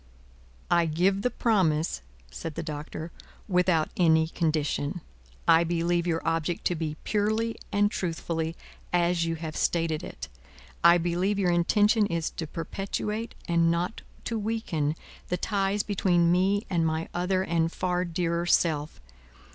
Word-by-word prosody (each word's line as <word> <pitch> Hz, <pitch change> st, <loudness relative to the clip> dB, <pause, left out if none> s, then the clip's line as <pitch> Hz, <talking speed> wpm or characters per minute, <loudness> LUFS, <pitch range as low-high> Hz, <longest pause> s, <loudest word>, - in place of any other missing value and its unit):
"I 170 Hz, -1 st, +4 dB
give 185 Hz, +5 st, +2 dB
the 250 Hz, -, +1 dB
promise," 185 Hz, -10 st, +1 dB, 0.3 s
said 155 Hz, -, -6 dB
the 165 Hz, -, -3 dB
Doctor, 155 Hz, +1 st, -6 dB, 0.4 s
"without 180 Hz, -4 st, +2 dB
any 160 Hz, -2 st, +4 dB
condition. 155 Hz, -1 st, -1 dB, 0.5 s
I 165 Hz, 0 st, +6 dB
believe 170 Hz, +1 st, 0 dB
your 165 Hz, -1 st, -1 dB
object 165 Hz, +1 st, -1 dB
to 175 Hz, -, +2 dB
be, 155 Hz, -2 st, -3 dB
purely 220 Hz, +2 st, 0 dB, 0.2 s
and 205 Hz, 0 st, +2 dB
truthfully, 165 Hz, -2 st, -2 dB, 0.4 s
as 175 Hz, -1 st, +2 dB
you 165 Hz, 0 st, -1 dB
have 160 Hz, -1 st, -6 dB
stated 165 Hz, -2 st, 0 dB
it. -, -, -7 dB, 0.6 s
I 170 Hz, +1 st, +8 dB
believe 175 Hz, +4 st, 0 dB
your 185 Hz, -3 st, +2 dB
intention 205 Hz, +5 st, +3 dB
is 170 Hz, -2 st, -2 dB
to 160 Hz, -, -5 dB
perpetuate, 210 Hz, +7 st, -4 dB
and 170 Hz, -1 st, +3 dB
not 175 Hz, +5 st, -1 dB, 0.2 s
to 230 Hz, -2 st, -2 dB
weaken, 200 Hz, -9 st, -1 dB, 0.3 s
the 180 Hz, -, 0 dB
ties 200 Hz, +1 st, 0 dB
between 175 Hz, -4 st, +2 dB
me 195 Hz, +4 st, +2 dB
and 170 Hz, -3 st, +1 dB
my 160 Hz, 0 st, -1 dB
other 185 Hz, +1 st, 0 dB
and 165 Hz, -2 st, 0 dB
far 180 Hz, 0 st, -1 dB
dearer 170 Hz, 0 st, -1 dB
self. 155 Hz, -4 st, +1 dB
170 Hz, 140 wpm, -27 LUFS, 165-195 Hz, 0.6 s, I